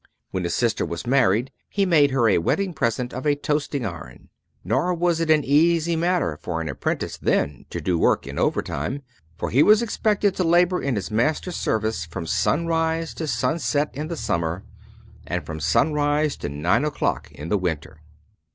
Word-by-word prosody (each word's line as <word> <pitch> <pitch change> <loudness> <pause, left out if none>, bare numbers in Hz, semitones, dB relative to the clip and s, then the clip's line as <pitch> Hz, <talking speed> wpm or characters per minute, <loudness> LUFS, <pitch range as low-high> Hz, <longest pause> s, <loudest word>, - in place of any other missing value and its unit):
When 95 -2 -2
his 85 - -1
sister 115 -3 +1
was 85 +7 -5
married 120 -2 +2 0.2
he 200 -1 +1
made 155 -6 +4
her 130 -4 +2
a 100 - +4
wedding 185 - 0
present 125 -2 -1
of 130 +4 -4
a 145 - +3
toasting 145 -3 -2
iron. 75 - -8 0.3
Nor 180 0 +1
was 170 -1 +1
it 165 -1 -1
an 155 -2 +4
easy 165 +4 +3
matter 170 - 0
for 85 -2 -3
an 80 - -3
apprentice - - -3
then 70 -3 0
to - - -4
do 90 -3 0
work - - +2
in - - -5
over - - +1
time, 130 - -4 0.3
for - - -3
he 130 - +4
was 215 +6 +6
expected 210 -3 +1
to 185 - +1
labor 175 +2 +3
in 140 -3 -1
his 100 0 -4
master's 155 +10 0
service 110 -5 -1
from 85 +1 -6
sunrise 165 - 0
to 160 - -4
sunset 145 +3 0
in 150 +4 -4
the 170 0 -5
summer, 85 - -2 0.6
and - - -3
from 80 0 -6
sunrise 145 - +1
to - - -4
nine 75 - +1
o'clock 150 -1 -2
in 75 +4 -8
the 105 - +2
winter. 80 -3 -4
140 Hz, 185 wpm, -23 LUFS, -, 0.6 s, was